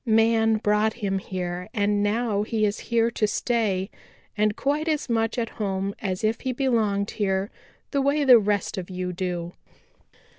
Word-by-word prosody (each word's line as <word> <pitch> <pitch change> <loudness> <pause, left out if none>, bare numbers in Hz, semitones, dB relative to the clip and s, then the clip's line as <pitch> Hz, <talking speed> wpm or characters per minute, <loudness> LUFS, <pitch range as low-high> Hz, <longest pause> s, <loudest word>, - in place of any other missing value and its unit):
Man 225 -1 +3
brought 210 0 +2
him 200 -4 -2
here 180 0 -5
and 205 -1 +1
now 210 0 +1
he 215 0 0
is 205 0 -1
here 235 0 +2
to 215 -2 +1
stay 210 -4 0 0.4
and 210 0 +1
quite 290 +5 -1
as 310 -2 0
much 225 0 0
at 230 -2 -1
home 195 -1 -1
as 190 -2 -3
if 220 +1 0
he 260 -1 -2
belonged 220 -6 0
here 195 -1 -1 0.4
the 280 - +1
way 285 +2 +2
the 255 -4 +8
rest 205 -2 -1
of 180 - -7
you 180 -1 -4
do. 175 -1 -3
210 Hz, 170 wpm, -25 LUFS, 195-230 Hz, 0.4 s, the